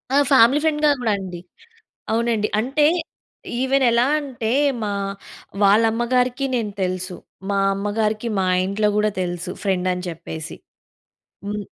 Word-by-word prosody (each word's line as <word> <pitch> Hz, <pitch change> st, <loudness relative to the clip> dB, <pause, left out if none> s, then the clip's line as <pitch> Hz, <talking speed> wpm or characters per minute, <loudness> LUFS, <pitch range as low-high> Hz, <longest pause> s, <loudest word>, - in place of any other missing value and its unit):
ఆ -, -, +5 dB
ఫ్యామిలీ 265 Hz, +3 st, +6 dB
ఫ్రెండ్‌గా 300 Hz, -1 st, +3 dB
కూడా 225 Hz, -3 st, +1 dB
అండి. 180 Hz, -2 st, -7 dB, 0.7 s
అవునండి. 225 Hz, -2 st, +1 dB
అంటే 270 Hz, +6 st, +2 dB, 0.7 s
ఈవెన్ 265 Hz, +1 st, +2 dB
ఎలా 235 Hz, +2 st, +3 dB
అంటే 250 Hz, -6 st, -4 dB, 0.3 s
మా 205 Hz, -1 st, -1 dB, 0.7 s
వాళ్ళ 200 Hz, +3 st, +5 dB
అమ్మగారికి 250 Hz, +3 st, 0 dB
నేను 225 Hz, -4 st, -1 dB
తెలుసు. 185 Hz, 0 st, -3 dB, 0.3 s
మా 200 Hz, -, +1 dB, 0.2 s
అమ్మగారికి 215 Hz, +3 st, -1 dB
మా 190 Hz, -, +1 dB, 0.2 s
ఇంట్లో 205 Hz, +2 st, 0 dB
కూడా 210 Hz, 0 st, +2 dB
తెలుసు 175 Hz, -1 st, -3 dB
ఫ్రెండ్ 185 Hz, -2 st, 0 dB
అని 180 Hz, 0 st, -4 dB
చెప్పేసి. 160 Hz, -1 st, -7 dB, 0.9 s
హ్మ్. 205 Hz, +1 st, -3 dB
215 Hz, 130 wpm, -21 LUFS, 190-245 Hz, 0.9 s, ఫ్యామిలీ